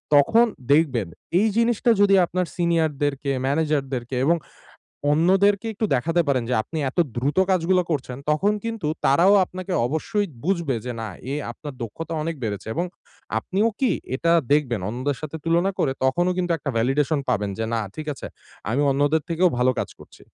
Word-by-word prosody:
তখন 225 +12 +5 0.3
দেখবেন 135 - +2 0.3
এই 215 - +3
জিনিসটা 235 0 +3
যদি 200 -1 +6
আপনার 180 +2 -1
সিনিয়ার-দেরকে, 150 -5 0
ম্যানেজার-দেরকে 135 -4 -1
এবং 170 +3 +3 0.8
অন্যদেরকে 195 +6 +3
একটু 220 - -1
দেখাতে 165 +7 +1
পারেন 130 -3 +2
যে, - - +2
আপনি 160 - -6
এত - - -15 0.2
দ্রুত 140 +8 0
কাজগুলা 185 0 +3
করছেন। 130 -4 -3
তখন 175 +8 +2
কিন্তু 225 -8 -3 0.2
তারাও 170 +9 +5
আপনাকে 185 +1 -7
অবশ্যই 160 +9 -1 0.2
বুঝবে 170 -8 0
যে, 125 - -3
না 110 - -4 0.2
এ - - -1 0.2
আপনার 145 +3 -9
দক্ষতা 165 +9 -5
অনেক 165 +2 -2
বেড়েছে 105 -3 -4
এবং 170 - 0 0.5
আপনিও 195 - 0
কি 265 - +3 0.2
এটা 165 +4 +2 0.2
দেখবেন 130 -7 +2
অন্যদের 130 +4 -2
সাথে 155 +1 -5
তুলনা 170 +3 +2
করে 135 - +1
তখনও 175 +7 +2
কিন্তু 175 -1 0
একটা 140 - -3
ভ্যালিডেশন 140 +6 +1
পাবেন 105 -4 0
যে, 115 - -1
"না 115 - 0 0.2
ঠিক 155 - -6
আছে - - -8 0.4
আমি 135 +5 +1
অন্যদের 145 +3 +2
থেকেও 175 +2 +3
ভালো 125 +1 +4
কাজ - - -2
করছি।" - - -16
155 Hz, 165 wpm, -23 LUFS, 135-180 Hz, 0.8 s, যদি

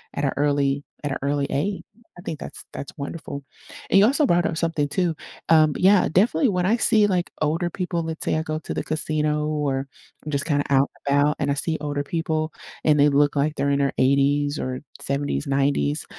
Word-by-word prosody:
at 145 - -1
a 135 - 0
early 145 -1 +1 0.2
at 145 - -2
a - - -1
early 140 0 0
age. 190 +8 -1 0.3
I - - -10
think 155 -4 -5
that's - - -6
that's 140 - -7
wonderful. 140 -1 -6 0.5
And 195 - +5
you 205 - +7
also 285 +5 +3
brought 175 -7 +2
up 160 - -3
something 160 -4 0
too. 170 +2 0 0.3
Um, 155 -2 +5
yeah, 190 +1 +5
definitely, 225 - +3
when 180 -2 0
I 220 +5 +3
see, 215 -2 +4
like, 180 -3 0
older 165 +3 0
people, 175 -2 -3
let's 160 -1 -4
say - - +1
I - - 0
go 155 -1 -3
to - - -6
the - - -3
casino 150 -1 -1
or 140 -3 -1 0.4
just 140 0 -1
kinda 145 -3 +1
out 140 0 +3 0.2
and 140 0 +3
about, 150 +1 +3
and 140 -1 0
I - - +3
see 160 +2 -1
older 145 -1 -2
people 160 0 -2 0.3
and 150 -2 +4
they 145 +1 +6
look 145 +1 +2
like 150 +2 +1
they're 140 - 0
in 140 0 +1
their 140 -1 +1
80s 140 +2 +2
or 130 0 -3 0.2
70s, 140 +2 -2
90s, 135 - +1
150 Hz, 210 wpm, -23 LUFS, 140-165 Hz, 0.5 s, you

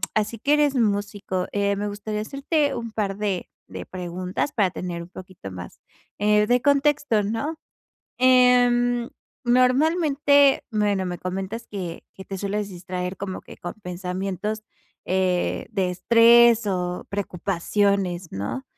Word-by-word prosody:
así 215 +1 -1
que 285 +6 +2
eres 295 -2 +3
músico. 205 -4 -1
Eh, 200 0 +1
me 205 +1 -3
gustaría 210 +1 -4
hacerte 280 +4 0
un 230 -2 -5
par 200 -3 -2
de 200 -4 -2 0.2
de - - -8
preguntas, 180 +6 -4
para 205 -5 +2
tener 175 -2 -5
un 170 - -13
poquito 185 - -10
más, 90 -1 -9 0.4
eh, 210 0 +3
de 245 +1 +3
contexto, 285 -5 +2
¿no? 230 +10 -3 0.6
Em, 245 -1 +4 0.3
normalmente 280 +2 +4
Bueno, 205 -3 +1
me 175 -1 -4
comentas 195 +5 -5
que 180 -5 -6
que 190 - -10
te 195 - -6
sueles 205 +1 -2
distraer, 180 +1 -5
como 190 -1 -5
que - - -13
con 175 - -6
pensamientos, 190 +2 -4 0.4
eh, 185 -1 0
de 190 -4 0
estrés 235 +3 +5
o 180 -2 -2
preocupaciones, 195 -1 -1
¿no? 100 - -4
205 Hz, 135 wpm, -24 LUFS, 185-240 Hz, 0.6 s, estrés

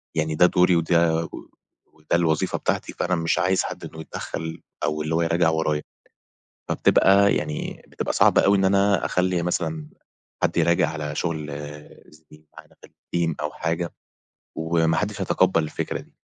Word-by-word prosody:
يعني 80 0 0
ده 90 - +6
دُوري، 90 0 +4
وده 85 0 +2 0.8
وده 75 -1 -6
الوظيفة 80 -3 +1
بتاعتي، - - -2
فأنا 90 +1 -1
مش 80 -1 0
عايز 95 +1 +2
حد - - -6
إنه 80 - -9
يتدخَّل، 80 0 -6 0.2
أو 75 0 -1
اللي 80 +1 -1
هو 85 - +2
يراجع 85 0 +2
ورايا، 80 -2 0 0.9
فبتبقى 100 +1 +4
يعني 75 0 -4
بتبقى - - -3
صعبة - - +4
أوي 100 +1 +5
إن 95 - +2
أنا 100 0 +3
أخلِّي 90 -1 0
مثلًا، 80 -3 -2 0.6
حد - - 0
يراجع 85 -1 +3
على 75 -1 -5
شغل 80 -2 -2 0.6
زِميل 75 0 -20
معانا - - -16
في - - -14
الteam 85 -2 -3
أو - - -2
حاجة، 85 +1 -3 0.6
وما 80 0 +1
حدش 105 +2 -2
هيتقبَّل 95 -2 +2
الفكرة 75 - -4
دي، - - -19
80 Hz, 155 wpm, -24 LUFS, 80-90 Hz, 0.9 s, ده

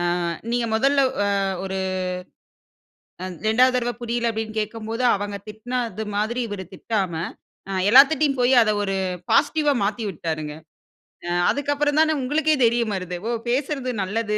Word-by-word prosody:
ஆ - - 0 0.5
நீங்க 240 0 0
முதல்ல 275 +5 +3 0.6
ஒரு 190 0 -3 1.7
2வுது 250 +4 +4
தடவ 245 -1 0
புரியல 235 0 -1
அப்டினு 220 0 -5
கேட்கும்போது 225 +3 -4
அவங்க 205 0 -4
திட்டினது 220 0 -4
மாரி 220 +4 0
இவர் 205 -3 -5
திட்டாம, 195 -2 -2 0.6
அ 195 - -3 0.2
எல்லாத்துட்டயும் 275 +2 +6
போய் 245 +2 +4
அத 215 -2 +3
ஒரு 195 -1 -1 0.4
பாசிட்டிவ்வா 295 0 +3
மாத்தி 215 +3 -1
விட்டாருங்க. 155 -3 -4 0.7
அ - - -2 0.2
அதுக்கப்புறம் 290 +1 +1
தான 315 0 +3
உங்களுக்கே 305 +4 +2
தைரியம் 235 -2 +2
வருது. 180 -1 -5 0.3
பேசுறது 265 0 -1
நல்லது 210 +2 -1
230 Hz, 125 wpm, -23 LUFS, 210-265 Hz, 1.7 s, எல்லாத்துட்டயும்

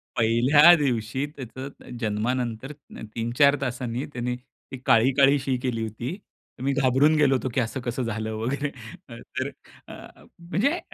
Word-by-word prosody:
पहिल्या 125 +9 +6
दिवशी 130 -3 -1
त्याचं 130 +1 -7 0.3
जन्मानंत 115 +2 -2 0.5
3-4 120 +5 +3
तासांनी 125 -1 -3
त्यांनी 125 0 -2 0.4
ती 130 - -5
काळी-काळी 135 +4 +4
शी 130 0 -1
केली 120 -3 -1
होती. 115 - -5 0.5
मी 140 - +1
घाबरून 140 +3 +3
गेलो 145 -3 +4
होतो, 130 0 -2
की - - +1
असं 120 +3 -3
कसं 120 +2 -3
झालं 110 -1 -3
वगैरे 140 +6 -2 0.5
तर - - -5 0.4
अ, - - -10 0.5
म्हणजे 215 - 0
130 Hz, 130 wpm, -25 LUFS, 115-140 Hz, 0.5 s, पहिल्या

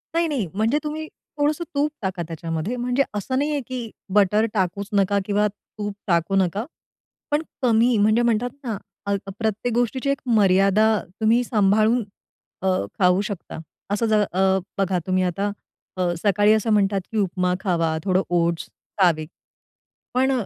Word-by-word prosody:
नाही, 335 0 +2
नाही. 275 -9 -1
म्हणजे 220 +8 +1
तुम्ही 310 +1 -4
थोडंसं 295 +2 -3
तूप 290 +2 +1
टाका 190 -3 -2
त्याच्यामध्ये. 165 +5 -3
म्हणजे 250 +2 +1
असं 210 +6 -2
नाहीये 290 +1 0
की 250 -3 -5 0.2
बटर 210 +2 +4
टाकूच 195 0 -1
नका 200 0 +2
किंवा 210 +1 +2 0.3
तूप 205 -1 -3
टाकू 170 +1 +1
नका. 195 +3 +1 0.7
पण 295 +1 +2 0.2
कमी 235 -1 +3
म्हणजे 215 +3 +4
म्हणतात 235 0 +1
ना 225 -5 -3 0.3
अ, 200 0 +1 0.2
प्रत्येक 220 +2 -1
गोष्टीची 245 +3 0
एक 275 - 0
मर्यादा 195 0 +4 0.4
तुम्ही 230 +3 +4
सांभाळून 220 +1 +3 0.6
अ, 190 - -1 0.3
खाऊ 180 +1 +4
शकता. 205 -6 -6 0.3
असं 210 +3 +1
जर 215 -1 +3
अ, 190 +1 +3 0.2
बघा 190 -2 +1
तुम्ही 185 0 +2
आता 195 +3 -1 0.5
अ, 180 -1 +1
सकाळी 205 +1 +4
असं 220 +1 +1
म्हणतात 200 -1 +2
की 225 - -3
उपमा 180 -2 +1
खावा, 165 -4 0
थोडं 185 -1 +2
ओट्स 170 -1 0 0.3
खावे. 165 -4 +3 0.9
पण 260 +2 +2
205 Hz, 150 wpm, -23 LUFS, 190-240 Hz, 0.9 s, बटर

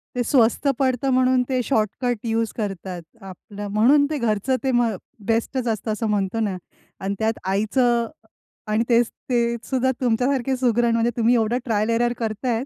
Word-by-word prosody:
ते 245 - 0
स्वस्त 240 +2 +2
पडतं 260 0 +1
म्हणून 255 0 +3
ते 255 -1 +1
शॉर्टकट 235 0 0
युज 225 0 0
करतात 190 -4 -4 0.2
आपलं 200 +2 -9
म्हणून 255 +8 +4
ते 305 - -2
घरचं 235 +1 0
ते 265 - +1
मग 240 -2 +2 0.3
बेस्टचं 230 +2 0
असतं 220 +1 -4
असं 215 +1 -2
म्हणतो 200 +1 0
ना 205 -4 -1 0.5
अन् 195 - -1
त्यात 220 0 +1 0.2
आईचं 235 +4 +1 0.6
आणि 215 +2 +1
तेच 235 -1 +4 0.2
ते 245 - +2 0.2
सुद्धा 260 -1 0
तुमच्यासारखी 255 +2 +1
सुगरण 240 -2 +2
म्हणजे 230 +1 +2
तुम्ही 235 +2 +3
एवढं 230 +1 +1
ट्रायल 215 -2 0
एरर 240 +1 +2
करतायेत 230 +2 -2
230 Hz, 160 wpm, -22 LUFS, 215-250 Hz, 0.6 s, म्हणून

